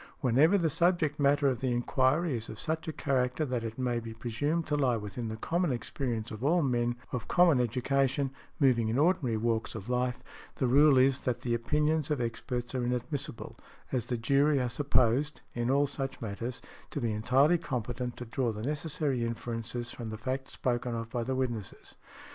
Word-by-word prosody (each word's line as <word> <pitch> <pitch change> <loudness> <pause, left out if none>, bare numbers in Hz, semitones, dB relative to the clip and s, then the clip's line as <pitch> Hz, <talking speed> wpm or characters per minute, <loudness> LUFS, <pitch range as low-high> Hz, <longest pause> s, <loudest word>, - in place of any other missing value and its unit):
Whenever 145 - +4
the 170 -4 +2
subject 160 -2 +1
matter 145 0 +4
of 130 -4 +1
the 130 -1 0
enquiry 130 +5 +1
is 115 -1 -5
of 110 - -8
such 160 +1 -3
a - - -1
character 135 0 0
that 125 -4 -2
it 115 -1 -5
may 125 -2 0
be 115 -1 -8
presumed 145 +9 -1
to 150 - 0
lie 130 -5 +2
within 105 +2 -5
the 110 0 -4
common 170 +6 0
experience 120 -2 -3
of 110 +2 -7
all 165 +4 +3
men 120 -2 +1 0.2
of 125 -2 -4
common 175 -6 +5
education, 135 +3 +1 0.3
moving 125 -6 +3
in 115 +3 0
ordinary 150 -7 +2
walks 115 0 -1
of 110 +1 -7
life, 125 0 0 0.4
the 130 - 0
rule 140 +3 +6
is 130 +1 +4
that 125 -3 -2
the 120 - 0
opinions 150 +5 +1
of 150 -3 0
experts 120 +1 -3
are 130 -2 -1
inadmissible, 125 +3 -3 0.4
as 125 -4 -1
the 120 - -1
jury 140 +5 +3
are 125 -1 0
supposed—in 125 -1 0
all 140 +2 +4
such 135 -1 -4
matters—to 115 +6 -6
be 120 -4 0
entirely 130 +10 +3
competent 125 -3 -3
to 125 - -6
draw 120 +1 -1
the 105 0 -6
necessary 145 -2 -1
inferences 115 +1 -4
from 115 -2 -6
the 110 - -5
facts 130 +4 -4
spoken 120 -1 -1
of 115 0 -5
by 120 - -1
the 130 +3 -2
witnesses. 120 -6 -4
125 Hz, 185 wpm, -30 LUFS, 120-145 Hz, 0.4 s, rule